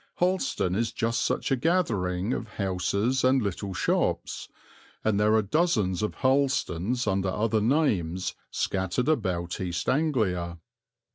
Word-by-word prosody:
Harleston 180 - 0
is 115 +4 0
just 115 0 -1
such - - -1
a - - +5
gathering 115 - 0
of 115 - -4
houses 100 +6 0
and 130 +1 +4
little 100 -2 -3
shops, 90 - -1 0.5
and 105 -2 +2
there 105 +1 +4
are 110 - +3
dozens 105 - +1
of 105 - -2
Harlestons 130 -5 +1
under 95 -2 0
other 110 +3 +1
names 105 - +1 0.2
scattered 95 +6 -1
about 95 - -1
East 90 -2 -3
Anglia. 105 - 0
105 Hz, 130 wpm, -27 LUFS, 95-130 Hz, 0.5 s, a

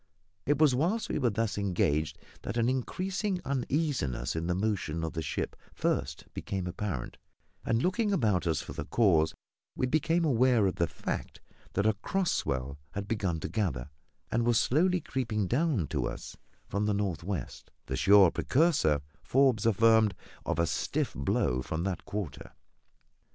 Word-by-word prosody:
It 145 0 +3
was 150 -3 +5
whilst 175 - 0
we - - -1
were 125 -4 +3
thus 110 -1 -1
engaged 80 -6 0 0.2
that - - -4
an 115 0 +2
increasing 185 - -1
uneasiness 130 - -1
in 80 +1 -2
the 90 - +1
motion 95 -5 -1
of 80 - -3
the 80 - -2
ship 75 - -3 0.2
first 70 +2 -1
became 95 -2 -3
apparent; 90 -7 -4 0.5
and 115 +1 +1
looking 205 +4 +1
about 105 - +1
us 80 -3 +1
for - - -8
the - - -5
cause, 85 -9 +3 0.4
we - - 0
became 160 +5 +1
aware 125 -5 +4
of 95 - 0
the 85 - +2
fact 70 - -5 0.3
that 100 - +1
a 110 - +4
cross 180 - -1
swell 70 +1 -2
had 100 0 -4
begun 100 -7 -1
to - - -3
gather, 75 - -2 0.4
and 115 +1 +2
was 120 -1 +3
slowly 180 +6 +2
creeping 115 -8 -1
down 130 - +1
to 70 -6 -1
us - - -7 0.3
from 105 +2 -1
the 105 - +1
north 95 -6 -2
west 95 0 -5 0.2
the - - -3
sure 100 -3 +6
precursor, 140 - +2 0.2
Forbes 120 +3 +3
affirmed, 110 -1 +4 0.3
of - - 0
a 85 - +3
stiff - - -1
blow 65 -2 0
from 80 +5 -3
that 95 -2 -3
quarter. 100 -7 -5
105 Hz, 165 wpm, -30 LUFS, 85-130 Hz, 0.5 s, sure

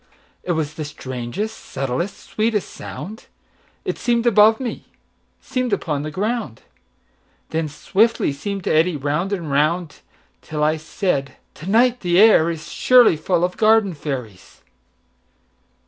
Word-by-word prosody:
It 175 - -1
was 155 -2 -2
the 155 -1 -5
strangest, 140 - -5
subtlest, 135 +9 -4
sweetest 215 -2 0
sound:It 215 +5 -9
seem'd 235 -1 +1
above 220 -1 +5
me, 250 -4 -5 0.5
seem'd 255 -4 -2
upon 150 -7 -1
the 155 - -4
ground, 205 - -3 0.9
Then 160 -1 -1
swiftly 200 +4 +1
seem'd 195 +6 -5
to - - 0
eddy 160 +2 +3
round 150 +7 -1
and 170 -7 -3
round, 155 +3 0 0.4
Till 150 -1 -3
I 155 +1 +2
said: 155 -4 -2 0.2
"To 160 - -11
night 245 +3 +3
the 175 -1 +2
air 210 -7 +7
isSurely 170 +7 +4
full 175 +1 0
of 180 0 -1
garden 215 -3 +4
fairies." 125 - -7
175 Hz, 130 wpm, -21 LUFS, 150-215 Hz, 0.9 s, air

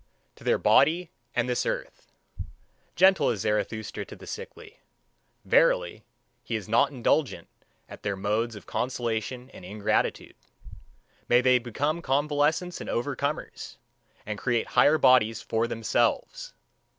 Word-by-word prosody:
To - - -15
their - - +2
body 170 +2 +3 0.2
and 120 0 +1
this 125 -1 0
earth. - - -5 0.8
Gentle 185 -3 +5
is 105 -5 -2
Zarathustra 110 0 -2
to - - -11
the - - -13
sickly. 460 0 -9 0.7
Verily, - - +2 0.4
he 115 - -4
is 105 -4 -4
not 120 +5 +3
indignant 130 - 0 0.4
at - - -12
their 100 -1 -2
modes 110 +4 -1
of 105 - -11
consolation 125 +1 -3
and - - -13
ingratitude. 105 +3 -2 0.9
May 120 +1 +5
they 125 0 +4
become 145 +7 -2
convalescents 150 +4 0
and - - -7
overcomers, 140 +4 -3 0.5
and 105 0 -5
create 120 -3 -1
higher 155 +2 +4
bodies 125 -5 +4
for 115 +1 0
themselves! 115 -1 -1
125 Hz, 125 wpm, -27 LUFS, 110-150 Hz, 0.9 s, Gentle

